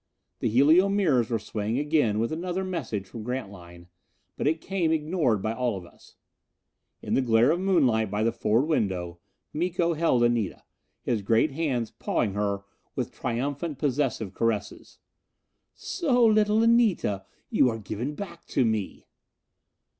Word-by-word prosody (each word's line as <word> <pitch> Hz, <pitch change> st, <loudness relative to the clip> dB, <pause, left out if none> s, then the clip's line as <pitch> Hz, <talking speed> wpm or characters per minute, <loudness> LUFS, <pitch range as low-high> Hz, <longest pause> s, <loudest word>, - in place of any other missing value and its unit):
The -, -, 0 dB
helio 155 Hz, -, +5 dB
mirrors 155 Hz, -, +2 dB
were 115 Hz, -, +1 dB
swaying 110 Hz, +1 st, -3 dB
again 145 Hz, -7 st, +1 dB
with 115 Hz, +5 st, 0 dB
another 180 Hz, +3 st, -2 dB
message 170 Hz, -, -3 dB
from 115 Hz, +3 st, -9 dB
Grantline. 95 Hz, -8 st, -7 dB, 0.5 s
But -, -, -1 dB
it 160 Hz, +2 st, +1 dB
came 180 Hz, -2 st, -1 dB
ignored 155 Hz, -, 0 dB
by 110 Hz, -, 0 dB
us -, -, -4 dB
all. 110 Hz, -8 st, -1 dB, 1.2 s
In -, -, -3 dB
the -, -, +3 dB
glare 120 Hz, +2 st, +4 dB
of 170 Hz, -, 0 dB
moonlight 135 Hz, -, +2 dB
by 105 Hz, +2 st, -1 dB
the 115 Hz, -, +2 dB
forward 115 Hz, +6 st, +1 dB
window, 90 Hz, -, -1 dB, 0.3 s
Miko 170 Hz, +1 st, 0 dB
held 155 Hz, -7 st, +2 dB
Anita, 120 Hz, -4 st, 0 dB, 0.4 s
his 115 Hz, -4 st, 0 dB
great 115 Hz, +8 st, +2 dB
hands 135 Hz, -6 st, -2 dB
pawing 105 Hz, -4 st, -1 dB
her 100 Hz, -1 st, -1 dB, 0.3 s
with -, -, -3 dB
triumphant 140 Hz, +5 st, -3 dB
possessive 130 Hz, -8 st, -1 dB
caresses. 105 Hz, -2 st, -3 dB, 0.8 s
"So, 260 Hz, -9 st, +1 dB
little 215 Hz, 0 st, +4 dB
Anita, 220 Hz, -, +2 dB, 0.2 s
you 125 Hz, -, +4 dB
are 115 Hz, -, -3 dB
given 110 Hz, +7 st, -5 dB
back 200 Hz, +3 st, -8 dB
to 130 Hz, -, +1 dB
me." 110 Hz, -3 st, -2 dB
125 Hz, 145 wpm, -26 LUFS, 110-165 Hz, 1.2 s, helio